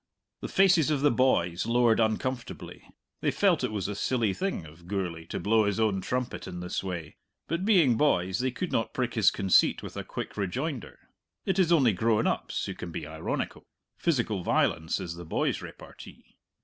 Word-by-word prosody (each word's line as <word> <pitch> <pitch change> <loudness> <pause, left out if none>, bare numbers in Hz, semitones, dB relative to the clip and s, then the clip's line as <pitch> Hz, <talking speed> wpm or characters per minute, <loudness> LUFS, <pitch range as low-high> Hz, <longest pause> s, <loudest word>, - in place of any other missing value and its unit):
The - - -5
faces 185 -6 +4
of 150 -3 +1
the 145 - +4
boys 110 -7 +1
lowered 120 -1 +3
uncomfortably. 115 +3 -2 0.4
They - - +1
felt - - +2
it - - 0
was 100 -4 -2
a 105 - -3
silly 110 0 0
thing 190 - -3
of 80 +3 -15
Gourlay 90 -4 -3
to - - -4
blow 110 +4 +3
his 100 +1 0
own 105 -4 +1
trumpet 125 +5 -3
in 90 -1 -6
this 90 +2 -3
way, 85 -5 -6 0.3
but, 170 +4 -2
being 170 - +4
boys, 95 -10 +2
they 130 +1 +1
could 175 +8 -4
not 115 - -1
prick 125 -2 -1
his 110 -4 +5
conceit 95 -3 +3
with - - -8
a - - -4
quick - - -6
rejoinder. 125 - -3 0.5
It 190 0 0
is 175 -3 +3
only 135 -10 +5
grown 110 +3 +1
ups - - -1
who - - -4
can 90 - -7
be 80 - -5
ironical; 80 +1 -4 0.3
physical 115 - 0
violence 80 +1 +1
is 90 -3 -5
the 85 - -7
boy's 80 - -1
repartee. - - -12
110 Hz, 190 wpm, -28 LUFS, 90-130 Hz, 0.5 s, his